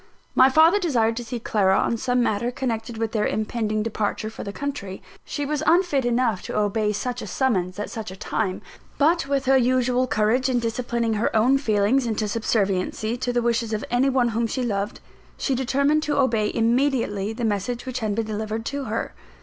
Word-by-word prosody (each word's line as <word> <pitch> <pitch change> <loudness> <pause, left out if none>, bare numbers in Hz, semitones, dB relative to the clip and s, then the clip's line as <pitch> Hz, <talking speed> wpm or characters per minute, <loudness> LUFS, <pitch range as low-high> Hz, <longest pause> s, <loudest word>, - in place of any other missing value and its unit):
My 260 +1 +6
father 320 +8 +5
desired 235 - +1
to 240 - -3
see 240 +1 -5
Clara 195 -4 +2
on - - +1
some 245 +2 +1
matter 220 +1 0
connected 235 -2 -3
with 225 -1 -2
their 215 -2 +1
impending 215 0 -1
departure 215 0 -2
for - - -8
the 200 - -5
country. 225 -7 -5 0.3
She 290 - -3
was 295 0 -2
unfit 335 -7 +3
enough 240 -4 +1
to - - -5
obey 210 0 +1
such 245 +4 -3
a - - -6
summons 190 -9 0
at 210 - -4
such 220 -4 -5
a 185 - -8
time; 190 0 -2 0.3
but 315 0 +2
with 275 -1 0
her 265 0 +5
usual 255 0 +2
courage 230 +4 +1
in 255 - +1
disciplining 235 0 -1
her 215 +1 +1
own 250 +5 +4
feelings 225 +1 +2
into 220 -1 -1
subserviency 215 0 -1
to 245 0 -2
the 240 -1 0
wishes 230 -1 0
of 215 - -2
any 250 +3 +3
one 255 -2 +2
whom 230 +1 0
she 255 +3 -2
loved, 205 -3 -2 0.4
she 275 - -1
determined 280 +4 +1
to 300 -1 -1
obey 225 -6 +2
immediately 230 -4 +1
the 230 +1 -3
message 220 +4 -2
which 255 -1 -3
had 215 -3 -1
been 225 0 -1
delivered 220 +1 -4
to 280 +1 -3
her. - - -3
235 Hz, 200 wpm, -24 LUFS, 215-260 Hz, 0.4 s, My